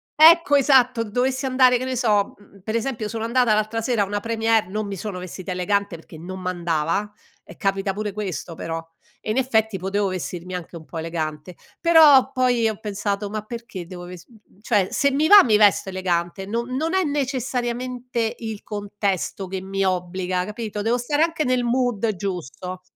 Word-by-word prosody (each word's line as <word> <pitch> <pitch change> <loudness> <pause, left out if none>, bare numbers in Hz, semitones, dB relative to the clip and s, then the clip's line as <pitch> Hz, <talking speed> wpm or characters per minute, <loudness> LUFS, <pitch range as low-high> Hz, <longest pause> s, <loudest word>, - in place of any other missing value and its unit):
Ecco, 320 -1 +7
esatto 255 -4 +4
dovessi 255 +5 -1
andare 255 -1 +4
che 245 - -5
ne 260 -1 -2
so 210 -4 +1
mhmm, 200 -1 -20
per 220 +2 -3
esempio 230 -2 -2
sono 225 0 -3
andata 235 -1 +3
l'altra 215 +2 0
sera 225 -3 +1
a - - -1
una 205 +1 -3
première, 225 -3 +1
non 210 +1 -3
mi 200 - -4
sono 195 0 -5
vestita 185 +1 -7
elegante 185 0 -1
perché 160 0 -13
non 185 +3 -7
m'andava, 175 +2 -1 0.3
e - - -14
capita 195 0 0
pure 210 +1 -4
questo 185 -5 -5
però, 165 0 -4 0.4
e 215 - -4
in 235 - -1
effetti 220 -5 +1
potevo 195 +2 -1
vestirmi 180 -1 -5
anche 175 -1 -7
un 160 - -13
po' 165 - -7
elegante, 160 0 -4 0.3
però 305 -6 +7
poi 250 -3 +2
ho 215 - -5
pensato: 205 -1 -3
"Ma 215 0 -3
perché 215 -5 -8
devo 175 0 -9
vest" 180 -1 -11 0.3
cioè, 205 -5 +2
se 280 -1 +1
mi 295 +3 +2
va 410 +2 +10
mi 215 -4 +4
vesto 205 -1 +4
elegante 185 0 -2
no 230 +4 -2
non 295 +8 -2
è 380 - +3
necessariamente 250 -4 -2
il 220 -3 -6
contesto 200 -3 -3
che 190 +1 -4
mi 195 +1 -2
obbliga, 180 0 -1
capito, 210 0 -5
devo 230 +3 +1
stare 290 +6 +1
anche 330 -2 0
nel 250 -1 +1
mood 235 -3 0
giusto. 180 -1 -5
210 Hz, 185 wpm, -23 LUFS, 185-245 Hz, 0.4 s, va